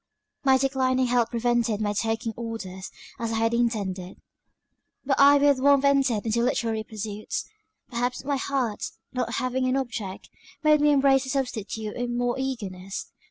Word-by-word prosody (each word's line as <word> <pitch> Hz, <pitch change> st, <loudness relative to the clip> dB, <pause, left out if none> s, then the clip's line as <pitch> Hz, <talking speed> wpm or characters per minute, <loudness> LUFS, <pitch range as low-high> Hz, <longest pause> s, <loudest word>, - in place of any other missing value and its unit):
"My 265 Hz, -1 st, +5 dB
declining 260 Hz, -1 st, +1 dB
health 245 Hz, -2 st, +2 dB
prevented 235 Hz, -2 st, +1 dB
my 205 Hz, -1 st, 0 dB
taking 225 Hz, +2 st, -1 dB
orders, 205 Hz, -5 st, -6 dB, 0.3 s
as 230 Hz, -1 st, -2 dB
I -, -, 0 dB
had 225 Hz, +1 st, +1 dB
intended; 200 Hz, -6 st, -1 dB, 0.9 s
but 270 Hz, 0 st, +1 dB
I 285 Hz, +1 st, +8 dB
with 285 Hz, -1 st, +4 dB
warmth 280 Hz, +1 st, +4 dB
entered 270 Hz, -6 st, +2 dB
into 230 Hz, +1 st, +1 dB
literary 230 Hz, -3 st, 0 dB
pursuits; 215 Hz, -1 st, -5 dB, 0.4 s
perhaps 245 Hz, +1 st, -2 dB
my 285 Hz, -1 st, 0 dB
heart, 260 Hz, -6 st, -2 dB, 0.3 s
not 250 Hz, -2 st, -2 dB
having 255 Hz, +1 st, 0 dB
an 255 Hz, +1 st, +1 dB
object, 225 Hz, -7 st, -5 dB, 0.3 s
made 305 Hz, -1 st, +5 dB
me 295 Hz, -, +5 dB
embrace 270 Hz, -1 st, +4 dB
the -, -, -6 dB
substitute 220 Hz, -5 st, -3 dB
with 245 Hz, 0 st, -2 dB
more 245 Hz, +1 st, 0 dB
eagerness. 195 Hz, -8 st, -5 dB
240 Hz, 155 wpm, -26 LUFS, 220-265 Hz, 0.9 s, I